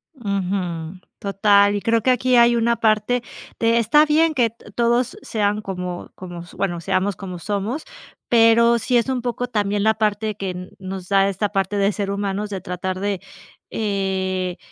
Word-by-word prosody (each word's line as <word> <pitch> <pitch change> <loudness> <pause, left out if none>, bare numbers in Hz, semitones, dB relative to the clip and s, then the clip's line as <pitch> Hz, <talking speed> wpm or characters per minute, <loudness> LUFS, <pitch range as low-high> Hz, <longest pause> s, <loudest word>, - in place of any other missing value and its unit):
Ujú, 185 - -3 0.2
total. 200 0 +3
Y 205 - -2
creo 230 +1 +2
que 260 - +1
aquí 255 0 +2
hay 235 0 +6
una 235 0 +2
parte 220 +2 +2 0.4
de 230 0 +3
está 235 +7 +5
bien 315 +1 +3
que 245 -5 +2 0.3
todos 240 +1 +1
sean 210 -1 -1
como 180 -3 -5
como 175 -2 -8
s 175 - -13
bueno, 175 -4 -2
seamos 190 +3 0
como 185 -2 -7
somos, 210 - -3 0.5
pero 235 0 +5
sí 245 +2 +1
es 235 +2 +1
un 255 -2 -1
poco 245 0 -2
también 205 -3 0
la 220 +1 +4
parte 215 0 -1
que 180 -2 -5
nos 190 -1 -6
da 195 0 +4
esta 200 +2 -1
parte 195 0 -1
de 200 +1 +2
ser 200 -1 -3
humanos 200 +1 -2
de 195 -2 -5
tratar 185 +1 -4
de, 200 -1 -1 0.5
eh 190 -3 -2
205 Hz, 170 wpm, -21 LUFS, 190-230 Hz, 0.5 s, hay